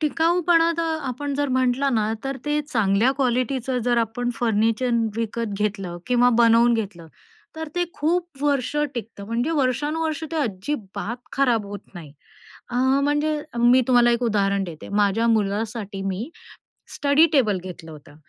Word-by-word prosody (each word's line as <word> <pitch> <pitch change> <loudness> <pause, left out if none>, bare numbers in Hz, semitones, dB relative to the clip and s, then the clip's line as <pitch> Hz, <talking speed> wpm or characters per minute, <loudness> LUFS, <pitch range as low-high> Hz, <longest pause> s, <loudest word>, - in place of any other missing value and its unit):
टिकाऊपणा 335 +2 +2
तर 325 -1 0
आपण 280 +3 -4
जर 285 0 0
म्हटलं 260 +1 +1
ना, 215 -1 +1
तर 270 0 -3
ते 295 0 0
चांगल्या 220 -3 +2
क्वालिटीच 255 -1 -1
जर 240 -1 +2
आपण 235 +2 -1
फर्निचर 225 +2 +1 0.3
विकत 230 -1 -3
घेतलं 195 -4 -2
किंवा 245 0 +4
बनवून 235 0 +5
घेतलं. 195 -7 -4 0.5
तर 320 0 -5
ते 355 - +1
खूप 335 -2 -2
वर्ष 285 -2 0 0.2
टिकतं 220 -4 -7
म्हणजे 235 +7 -1
वर्षानुवर्ष 300 +3 -1
ते 325 - -2
अजिबात 225 -2 -3 0.2
खराब 240 -6 +1
होत 200 -1 -10
नाही. 155 -5 -10 0.6
अ, 245 - -6 0.3
म्हणजे 295 +1 +1 0.2
मी 240 +2 +5
तुम्हाला 240 -1 +5
एक 235 +1 0
उदाहरण 200 -3 +1
देते. 165 -4 -9
माझ्या 205 +2 +1
मुलासाठी 210 -1 -1
मी 195 - -3 0.6
स्टडी 285 +3 +4
टेबल 215 -8 +3
घेतलं 165 -3 -9
होतं 145 -1 -14
240 Hz, 145 wpm, -23 LUFS, 210-285 Hz, 0.6 s, बनवून